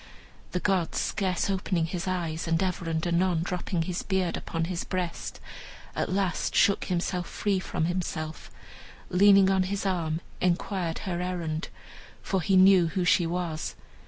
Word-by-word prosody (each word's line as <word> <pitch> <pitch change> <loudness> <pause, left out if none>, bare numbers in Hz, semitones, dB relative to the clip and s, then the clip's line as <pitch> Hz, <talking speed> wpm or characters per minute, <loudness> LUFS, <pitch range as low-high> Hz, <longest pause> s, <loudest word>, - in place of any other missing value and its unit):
The 180 - -1
god, 185 -3 0
scarce 185 -4 0
opening 185 -3 0
his 175 +2 -4
eyes, 170 -3 -2
and 165 +3 +2
ever 180 -2 -2
and 160 +1 -1
anon 175 -1 +2
dropping 180 -1 -2
his 175 +1 -3
beard 190 -3 0
upon 165 0 -3
his 175 0 -3
breast, 180 -3 -4 0.6
at - - -1
last 185 -3 0
shook 200 - +4
himself 180 0 -2
free 200 -2 0
from 160 -3 -2
himself, 165 -3 -3 0.6
and 180 - 0
leaning 195 -1 +7
on 190 -1 +3
his 195 +2 -2
arm, 170 -4 -1 0.2
inquired 180 -1 0
her 175 -2 -2
errand, 170 -3 -3 0.6
for 190 -2 0
he 190 +3 +3
knew 185 -2 +7
who 180 +2 -1
she 175 0 +4
was. 170 -2 -3
180 Hz, 160 wpm, -27 LUFS, 165-190 Hz, 0.6 s, leaning